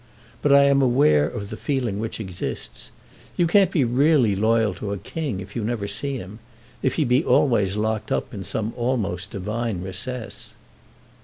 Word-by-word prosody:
But 145 - +2
I 140 0 +7
am 140 0 +4
aware 120 - +4
of 100 +1 -6
the - - -4
feeling 125 -6 -2
which 110 0 -4
exists. 95 -5 -6 0.5
You 175 - +3
can't 190 +2 +4
be 165 -7 +2
really 125 -2 +3
loyal 110 0 +2
to 100 +2 -5
a - - -3
king 135 - -4
if 95 +2 -11
you 115 - -2
never 110 -2 -2
see 130 +7 -1
him, 105 0 -9 0.4
if 130 - 0
he 155 - +1
be 125 +4 +3
always 105 - +2
locked 110 0 -2
up - - -1
in 100 -3 -5
some 105 +4 -3
almost 110 -7 -2
divine 105 -1 -3
recess." 110 +6 -6
115 Hz, 175 wpm, -23 LUFS, 100-130 Hz, 0.5 s, I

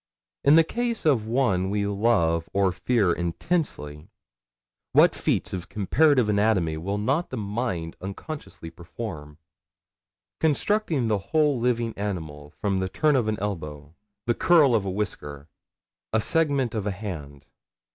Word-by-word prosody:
In 140 +2 +6
the 165 - +7
case 235 +4 -3
of 125 -8 +2
one 105 -7 +1
we 100 0 0
love 100 -6 +1
or 100 -1 +2
fear 100 -1 +1
intensely, 85 - -2 0.9
what - - +6
feats - - -1
of 90 -2 -5
comparative 125 - +3
anatomy 100 -6 +2
will 100 +6 -3
not 135 +11 0
the - - -5
mind 100 -6 -3
unconsciously 100 - -7
perform? 85 -4 -8 1.0
Constructing 160 - +1
the 105 -2 +1
whole 150 -4 +2
living 115 -1 0
animal 80 -8 -5
from 95 +4 -2
the 95 0 -2
turn 150 +7 +2
of 120 -4 +1
an 110 -1 0
elbow, 75 -7 -5 0.3
the 120 - +2
curl 150 -1 +4
of 105 -4 +2
a - - -2
whisker, 75 -8 -4 0.6
a - - +2
segment 140 -3 +1
of 105 -2 -2
a - - 0
hand. 75 -8 -7
105 Hz, 140 wpm, -25 LUFS, 85-130 Hz, 1.0 s, the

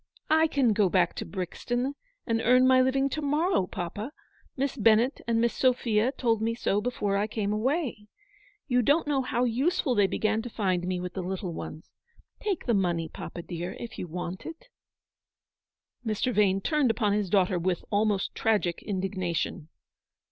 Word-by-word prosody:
I 320 +1 +5
can 265 -7 +2
go 205 -2 +3
back 175 -2 +2
to - - -3
Brixton 240 +8 -3 0.3
and 225 -1 0
earn 250 +3 +5
my 255 0 +6
living 270 +1 +2
to 305 - -3
morrow, 300 - +1
papa. 205 - -5 0.5
Miss 275 +1 -1
Bennett 230 +2 +3
and 230 -1 +2
Miss 235 0 +2
Sophia 245 -2 +2
told 230 -5 0
me 230 +1 0
so 205 -3 0
before 205 -4 -1
I 205 +1 0
came 210 -2 -2
away. 240 -2 -1 0.6
You 250 -2 +3
don't 290 +8 +3
know 285 -2 +1
how 250 -1 -1
useful 265 +4 +1
they 205 -4 +4
began 220 +2 0
to 245 - -7
find 185 -5 -1
me 180 -1 -1
with 180 0 -5
the 190 - -3
little 185 -1 -4
ones. 155 0 -8 0.5
Take 405 -5 -2
the 235 - +2
money, 175 -5 0
papa, 170 - -7
dear, 175 +1 -5
if 235 -1 -7
you 180 - -4
want 175 +2 -5
it." 330 +10 -10 1.3
Mr. 225 +2 -1
Vane 195 -2 +3
turned 300 +1 +2
upon 215 -2 +1
his 205 -2 0
daughter 185 -2 +2
with 175 0 -1
almost 205 -1 +1
tragic 205 -6 0
indignation. 185 -5 -2
220 Hz, 170 wpm, -28 LUFS, 190-255 Hz, 1.3 s, my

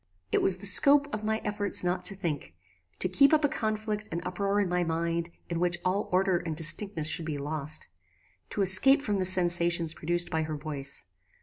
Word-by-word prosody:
"It - - +1
was 190 -1 +4
the 195 - -6
scope 280 +8 +4
of 215 - -5
my 220 +1 -3
efforts 205 -2 +1
not 180 +1 -2
to 195 - +2
think; 155 - -6 0.4
to - - 0
keep 275 - +3
up 305 -1 0
a - - +3
conflict 215 -3 -4
and 165 - -3
uproar 200 +3 -2
in 200 - 0
my 180 0 -1
mind 165 0 -3 0.2
in 170 -1 -4
which 175 0 0
all 190 +3 -2
order 185 -1 +1
and 165 -3 -6
distinctness 165 +1 +3
should 160 0 -3
be 150 -2 -4
lost; 150 +1 -4 0.6
to 205 - -2
escape 270 +10 +6
from 205 -5 -2
the 185 - -1
sensations 175 -2 +2
produced 175 +2 -3
by 160 -2 -1
her 155 -1 -5
voice. 140 - -3
180 Hz, 200 wpm, -27 LUFS, 165-205 Hz, 0.6 s, escape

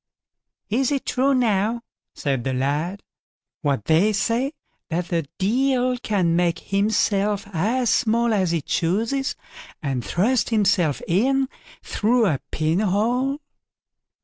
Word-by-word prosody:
"Is 255 +4 +1
it 280 -2 -1
true, 270 +2 +2
now", 230 -1 +1 0.3
said 135 -4 -1
the 130 - -1
lad, 150 +9 -1 0.6
"what 140 -8 -1
they 175 +7 +3
say, 240 +7 0 0.4
that 175 +1 -2
the 165 -4 -1
Deil 255 +5 +1
can 185 -8 +1
make 175 -1 +1
himself 205 0 0
as 225 +8 +1
small 230 0 +2
as 190 -4 +1
he 165 -1 0
chooses, 225 - -1 0.4
and 135 -5 -2
thrust 220 - +1
himself 190 - +2
in 265 +9 +2 0.4
through 230 +2 +1
a 155 -9 +1
pinhole?" 215 - 0
205 Hz, 120 wpm, -23 LUFS, 170-240 Hz, 0.6 s, they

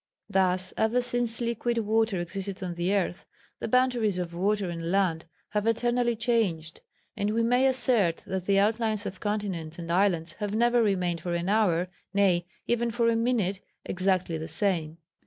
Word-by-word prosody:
"Thus, 185 -2 +1
ever 220 +3 +2
since 245 -1 0
liquid 235 0 -1
water 220 -2 +1
existed 190 +2 -5
on 180 -1 -3
the 175 +2 -1
earth, 195 -3 0 0.4
the - - -3
boundaries 240 -5 +2
of 175 -1 -4
water 200 +3 0
and 165 -1 -4
land 180 -4 +1 0.2
have 210 +1 -1
eternally 240 +1 +1
changed, 215 -9 -1 0.3
and 205 -1 -1
we 230 - +2
may 250 +3 +3
assert 240 -10 +3
that 190 -1 -4
the 200 -1 +3
outlines 215 +1 +1
of 185 - -5
continents 195 -7 -3
and 170 -1 -5
islands 175 -3 +1
have 210 -1 -2
never 240 +1 +3
remained 180 -5 0
for 175 -1 -2
an 170 +2 -2
hour, 185 -5 +2 0.3
nay, 180 -4 +3 0.2
even 235 0 0
for 230 0 +1
a 230 - +2
minute, 225 -5 0 0.3
exactly 185 -3 0
the 160 - -5
same. 165 -2 -1
200 Hz, 170 wpm, -27 LUFS, 175-230 Hz, 0.4 s, may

